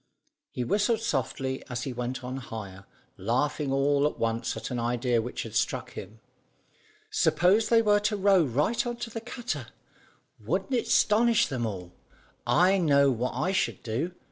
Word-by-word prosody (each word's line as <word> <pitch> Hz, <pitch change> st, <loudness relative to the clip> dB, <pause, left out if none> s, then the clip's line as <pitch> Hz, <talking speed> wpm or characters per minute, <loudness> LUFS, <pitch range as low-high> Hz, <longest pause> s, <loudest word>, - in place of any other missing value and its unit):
He 125 Hz, -, -4 dB
whistled 210 Hz, -, +1 dB
softly 135 Hz, -, -2 dB
as 125 Hz, -1 st, -3 dB
he 135 Hz, -, -4 dB
went 125 Hz, +1 st, -4 dB
on 130 Hz, +1 st, -4 dB
higher, 100 Hz, -6 st, -8 dB, 0.3 s
laughing 135 Hz, +7 st, -1 dB
all 140 Hz, +1 st, +2 dB
at -, -, -5 dB
once 115 Hz, 0 st, -1 dB
at 110 Hz, -, -6 dB
an 125 Hz, -, -2 dB
idea 120 Hz, 0 st, +1 dB
which 120 Hz, +1 st, -5 dB
struck -, -, -1 dB
him. 105 Hz, +4 st, -9 dB, 0.9 s
"Suppose 180 Hz, +7 st, +3 dB
they 230 Hz, -1 st, +5 dB
were 205 Hz, -1 st, +4 dB
to 210 Hz, 0 st, 0 dB
row 195 Hz, -2 st, +4 dB
right 145 Hz, -, 0 dB
on 240 Hz, 0 st, -3 dB
to 240 Hz, -1 st, -6 dB
the 225 Hz, -, -5 dB
cutter! 245 Hz, +1 st, -5 dB, 0.7 s
Wouldn't 270 Hz, -, -2 dB
it 240 Hz, -, 0 dB
'stonish 235 Hz, +2 st, +4 dB
them 125 Hz, -5 st, -2 dB
all? 90 Hz, -4 st, -7 dB, 0.5 s
I 190 Hz, +2 st, +4 dB
know 140 Hz, -5 st, +4 dB
what 125 Hz, +1 st, -2 dB
I 155 Hz, +9 st, 0 dB
should 120 Hz, -, -1 dB
do. 135 Hz, +11 st, -3 dB
135 Hz, 165 wpm, -27 LUFS, 120-200 Hz, 0.9 s, they